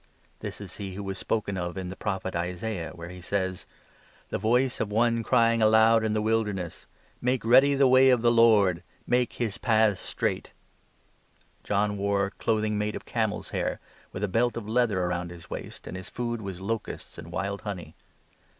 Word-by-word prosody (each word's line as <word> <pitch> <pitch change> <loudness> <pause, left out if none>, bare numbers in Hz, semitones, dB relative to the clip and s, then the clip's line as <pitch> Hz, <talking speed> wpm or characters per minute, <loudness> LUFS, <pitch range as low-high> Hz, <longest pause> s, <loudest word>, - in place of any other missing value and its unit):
This - - -6
is - - -9
he 95 -2 -6
who 100 - -5
was 95 -1 -4
spoken 100 -3 -1
of 90 +1 -4
in 95 -1 -4
the 95 - -6
Prophet 95 -3 -3
Isaiah, 90 +1 -3
where 85 0 -8
3 90 - -9
he - - -10
says 95 0 -2 0.2
— - - -31
' - - -31
The - - -1
voice 125 +5 +2
of 105 - -2
one 115 +2 +2
crying 115 0 +3
aloud 110 +1 +5
in 110 -1 0
the 105 0 0
Wilderness: 105 -6 -1 0.2
" - - -32
Make 125 -2 0
ready 135 +4 +6
the 135 -1 +5
way 130 +1 +6
of 125 -2 +3
the 120 - +5
Lord, 105 -7 +5 0.2
Make 125 -1 +1
his 115 -5 -3
paths 110 -4 +3
straight."' - - -3 1.1
John 105 0 0
wore 100 0 +1
clothing 110 -1 0
made 105 0 -1
of - - -7
camels' - - -2
hair, - - -2 0.3
with 95 - -5
a - - +2
belt 115 +5 +1
of 115 - -4
4 105 - -7
leather 110 -7 +2
round 90 0 -2
his 85 -1 -12
waist, - - -7
and - - -7
his 95 +1 -7
food 120 -1 -3
was 95 -3 -6
locusts 110 +3 -5
and 85 - -9
wild 100 +3 -3
honey. 90 -6 -6
105 Hz, 200 wpm, -27 LUFS, 95-115 Hz, 1.1 s, ready